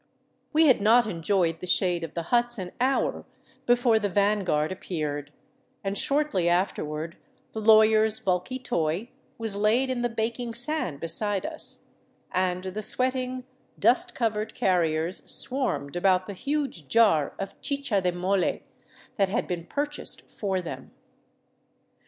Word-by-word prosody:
We 315 +1 +5
had 260 -8 +5
not 230 +3 +5
enjoyed 170 -3 0
the 180 - -7
shade 175 -1 +2
of 165 - -7
the 170 - -2
huts 240 0 +3
an 185 -2 -5
hour 265 +1 +1 0.4
before 240 -2 +4
the 205 -1 -1
van 205 +1 +2
guard 155 -3 0
appeared, 150 -6 -4 0.5
and 195 0 -2
shortly 275 - +1
afterward 165 -2 -1 0.3
the 220 - -5
lawyer's 220 0 +5
bulky 185 +6 -1
toy 170 -2 -2 0.3
was 225 -3 -1
laid 230 +6 +2
in 250 -2 -2
the 240 - +1
baking 230 +1 -3
sand 240 - -1
beside 195 +5 -1
us, 315 0 -5 0.5
and 185 0 0
the 190 +3 -4
sweating, 255 +2 0 0.3
dust 355 +8 +2
covered 220 -2 -1
carriers 170 -2 +1
swarmed 165 - -2
about 185 0 +3
the 200 - -6
huge 275 - -3
jar 205 -10 +3
of 195 - -7
chicha 280 -8 0
de 180 -1 +1
moUe 180 +2 0 0.5
that 195 -2 +2
had 205 - 0
been 170 -2 -4
purchased 295 +5 -3
for 190 -3 -2
them. 170 - -7
205 Hz, 140 wpm, -26 LUFS, 180-240 Hz, 0.5 s, We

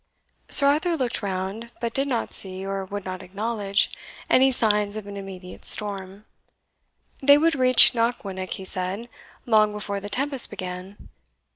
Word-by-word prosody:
Sir 280 - +7
Arthur 315 +4 +1
looked 255 -4 -2
round, 195 +3 -5
but 235 -1 -4
did 275 +1 -1
not 245 -4 -3
see, 190 0 0
or 195 0 -4
would 200 +1 -7
not 185 -1 -6
acknowledge, 200 +1 -1 0.4
any 265 +1 +4
signs 210 -4 +1
of 215 -2 -7
an 200 0 -9
immediate 190 -2 -10
storm. 200 -1 +2 1.0
They 285 +1 +6
would 325 +2 +2
reach 255 -3 +6
Knockwinnock, 200 -6 -3
he 190 - -7
said, 190 +6 -4 0.4
long 215 -2 +3
before 200 -1 -5
the 205 +1 -7
tempest 270 +4 +2
began. 185 0 -8
205 Hz, 150 wpm, -23 LUFS, 190-240 Hz, 1.0 s, Sir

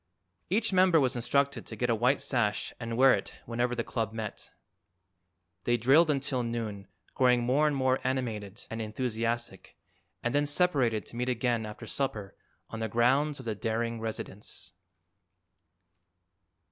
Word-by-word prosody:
Each 210 +3 +1
member 185 -3 +5
was 130 -3 +1
instructed 140 +1 0
to 110 - -6
get 120 +2 0
a - - +4
white 125 +5 +2
sash 110 -5 0
and 115 -1 -4
wear 130 +1 +7
it - - -3
whenever 120 +1 -1
the 120 - -1
club 110 -3 -3
met. 110 -1 -6 1.1
They 120 0 +2
drilled 140 +8 +5
until 135 -3 0
noon, 110 -4 -4 0.3
growing 125 -2 +3
more 135 +5 +3
and 150 - +1
more 130 -1 +2
animated 115 -6 -3
and 115 0 -3
enthusiastic, 115 -2 -3 0.5
and 120 - 0
then 145 0 +2
separated 140 - +2
to - - -12
meet 125 +1 -1
again 120 -2 0
after 105 +2 -8
supper 110 -5 -3 0.4
on 115 - -5
the 110 0 -2
grounds 135 +7 +2
of 130 - -9
the 110 - -1
Daring 115 +2 -2
residence. 110 -2 -6
120 Hz, 150 wpm, -29 LUFS, 115-135 Hz, 1.1 s, wear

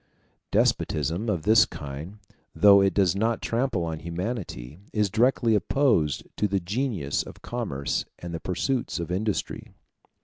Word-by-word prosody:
Despotism 80 - +1
of 90 -7 -1
this 110 +2 +6
kind, 75 +8 -8 0.4
though 100 -1 +7
it 95 0 +3
does 95 -3 +3
not 115 +3 +1
trample 115 -6 -1
on 80 -1 -4
humanity, 85 - -5
is 105 -3 0
directly 115 0 +3
opposed 105 - +2
to 105 - +2
the 100 -1 0
genius 95 - -1
of - - -11
commerce 100 - -2
and 85 -1 -7
the 85 - -3
pursuits 115 +7 -2
of 85 0 -4
industry. 105 +3 -2
100 Hz, 140 wpm, -26 LUFS, 85-115 Hz, 0.4 s, though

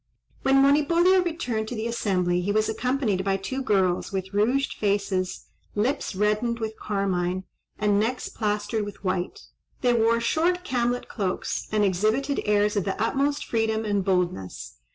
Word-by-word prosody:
When 270 0 +4
Monipodio 335 +6 +4
returned 250 -11 -2
to 245 - -4
the 220 0 -3
assembly 185 -6 0
he 195 +3 -1
was 215 +1 +2
accompanied 235 -4 0
by 195 0 +1
two 260 +8 -4
girls, 190 -7 +1
with 190 0 -4
rouged 245 +7 +1
faces, 200 -3 -1 0.3
lips 240 +1 -1
reddened 210 +4 +1
with 220 -1 -4
carmine, 185 -2 -1 0.3
and 205 -1 +2
necks 235 +4 -1
plastered 210 0 -1
with 205 -1 -8
white. 185 -1 -2 0.4
They 245 -1 +3
wore 230 0 +3
short 340 +9 +1
camlet 245 -1 0
cloaks, 195 -4 -3
and 210 -1 +3
exhibited 215 +9 +1
airs 210 0 +2
of 200 - +1
the 195 +1 -3
utmost 280 +6 0
freedom 225 -1 0
and 205 -2 0
boldness. 180 - -2
215 Hz, 155 wpm, -25 LUFS, 195-245 Hz, 0.4 s, When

